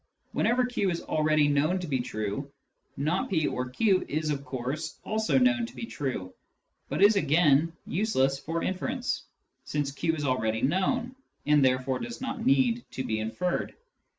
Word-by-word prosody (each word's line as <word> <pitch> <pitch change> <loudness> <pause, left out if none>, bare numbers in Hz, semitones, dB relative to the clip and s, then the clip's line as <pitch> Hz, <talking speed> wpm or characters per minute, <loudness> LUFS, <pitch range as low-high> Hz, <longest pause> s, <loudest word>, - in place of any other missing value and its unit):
Whenever 245 +2 +2
q 245 -6 0
is 170 -1 -3
already 155 -1 +2
known 145 +5 +2
to 180 - -4
be 135 -5 -1
true, 110 +3 -3 0.2
" - - -46
not 155 +7 0
p 160 -5 +1
or 125 -2 -2
q 190 - +2
" - - -21
is 155 -1 -1
of 140 -1 -3
course 135 +4 -4
also 220 +3 +1
known 255 -1 +3
to - - -14
be - - -5
true, 130 - -4 0.6
but - - +1
is 205 +1 +7
again 155 -1 +4
useless 135 -9 +1
for 165 +3 -3
inference, 245 +7 -2 0.4
since 145 -2 -2
q 160 +3 -1
is 145 -2 -3
already 110 -4 0
known, 230 - +1 0.3
and 150 -1 +4
therefore 130 0 +1
does 235 0 -6
not 265 -2 -4
need 245 -2 +3
to 130 - -4
be 110 -3 -1
inferred. 170 +12 -2
155 Hz, 175 wpm, -28 LUFS, 135-215 Hz, 0.6 s, is